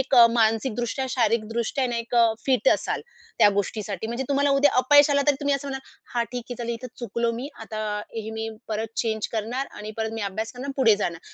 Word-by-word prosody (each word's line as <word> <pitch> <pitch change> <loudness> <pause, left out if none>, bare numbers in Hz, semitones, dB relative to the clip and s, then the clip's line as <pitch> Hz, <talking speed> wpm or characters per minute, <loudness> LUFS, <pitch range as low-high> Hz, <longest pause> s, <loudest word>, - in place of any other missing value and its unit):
एक 265 +1 0
अ, 240 -2 +9
मानसिकदृष्ट्या, 235 +3 +1
शारीरिकदृष्ट्या 230 +2 0
ना, 240 - -2
एक 230 +1 -4
अ, 235 -1 +6 0.2
फिट 265 - +3
असाल - - +1 0.4
त्या 205 - +7
गोष्टीसाठी. 210 +1 -4
म्हणजे 235 +3 -3
तुम्हाला 280 0 +2
उद्या 290 +1 +5
अपयश 290 +2 +6
आलं 280 0 +3
तरी 290 - +5
तुम्ही 285 -1 +2
असं 275 +1 -4
म्हणालं, 265 0 -6 0.3
"हां 235 -1 +2
ठीक 245 -1 -3
आहे, 245 - -2
चालेल 235 -1 -3
इथे 250 +2 -7
चुकलो 235 -1 -1
मी 250 +5 -5
आता 215 -1 -5 0.3
हे 220 0 -4
मी 220 0 -4 0.2
परत 220 +1 -2
चेंज 220 -2 0
करणार 235 +5 -2
आणि 210 +1 -8
परत 220 0 -1
मी 225 - -4
अभ्यास 220 +3 -4
करणार 255 +2 -7
आणि 275 - -3
पुढे 230 -6 +5
जाणार." 170 -5 -3
235 Hz, 215 wpm, -25 LUFS, 220-265 Hz, 0.4 s, अ